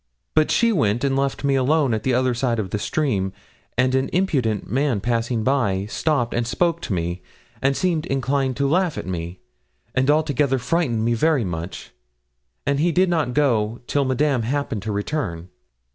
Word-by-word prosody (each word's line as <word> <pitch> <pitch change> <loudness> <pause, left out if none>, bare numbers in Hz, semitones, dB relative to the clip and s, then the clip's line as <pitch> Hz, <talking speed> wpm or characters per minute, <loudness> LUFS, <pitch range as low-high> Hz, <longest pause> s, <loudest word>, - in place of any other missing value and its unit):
But 155 -1 +3
she 235 -1 +3
went 115 - +1
and 135 -1 +1
left 135 +1 -1
me 140 -1 +2
alone 135 0 +2
at 110 - -1
the 130 - 0
other 130 0 +2
side 120 -1 0
of 100 -4 -3
the 105 - -1
stream, 100 -10 -1 0.4
and 130 +1 +3
an 130 0 +1
impudent 135 - 0
man 135 -4 +1
passing 115 +1 -1
by 110 -7 +1
stopped 120 +2 0
and 120 0 -1
spoke 170 +5 0
to 105 - -3
me, 85 +1 -2 0.4
and 135 +1 +2
seemed 170 -4 0
inclined 135 -1 0
to 140 0 +1
laugh 175 +1 +1
at - - -4
me, 90 0 -5 0.5
and 130 +2 +1
altogether 145 -3 +2
frightened 125 -4 0
me 120 - +2
very 140 0 +2
much, 85 0 -6 0.7
and 140 0 +1
he 170 +3 +2
did 185 +2 +3
not 155 -8 0
go 120 -6 +1
till 145 +2 +1
Madame 130 0 +1
happened 125 -3 -2
to 110 +2 -4
return.' 100 - -3
130 Hz, 180 wpm, -22 LUFS, 110-145 Hz, 0.7 s, But